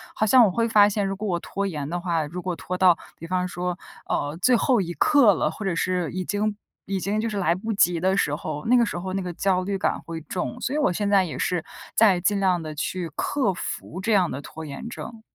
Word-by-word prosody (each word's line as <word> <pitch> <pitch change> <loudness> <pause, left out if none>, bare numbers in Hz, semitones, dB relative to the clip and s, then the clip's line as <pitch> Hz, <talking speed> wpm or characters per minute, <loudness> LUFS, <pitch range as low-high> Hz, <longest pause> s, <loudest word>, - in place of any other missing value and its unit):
好 220 - +1
像 250 +3 +7
我 215 - +5
会 230 +5 0
发 210 -2 +6
现， 205 0 -1
如 195 0 -2
果 210 +2 -4
我 175 -3 0
拖 200 +3 -3
延 150 -6 -4
的 175 +3 -3
话， 170 -3 -1
如 175 +5 -6
果 180 -1 -3
拖 180 +2 -5
到 180 -2 +5 0.2
比 165 - -8
方 180 +1 0
说， 180 0 -3 0.3
呃， 145 +2 -1
最 255 +4 +5
后 240 -1 +3
一 175 -2 -4
刻 240 - +5
了， 155 - 0
或 210 - -8
者 190 -4 -1
是 180 -1 0
已 185 0 -3
经 210 +2 -1 0.3
已 195 -1 -2
经 200 +3 -1
就 230 - -1
是 210 - -4
来 175 -4 +2
不 220 +5 -4
及 175 -4 +3
的 190 +3 +2
时 145 - +1
候， 150 -1 -5
那 245 - +4
个 240 - +5
时 190 - -4
候 185 +1 -4
那 195 - -1
个 180 -1 -4
焦 185 +1 +1
虑 195 +1 -2
感 - - 0
会 165 -1 -5
重， 180 +9 -4
所 270 - -2
以 - - +1
我 295 - +2
现 205 +3 -1
在 200 -2 +5
也 170 - -5
是 175 -3 0 0.3
在 205 -5 +5
尽 200 +3 +1
量 185 -3 +2
的 155 -1 -6
去 175 +3 -3
克 260 -9 0
服 180 0 -6
这 225 +4 -1
样 185 -4 +3
的 140 - -5
拖 160 +2 -9
延 140 +8 -7
症。 235 -1 -8
185 Hz, 280 characters per minute, -24 LUFS, 175-205 Hz, 0.3 s, 像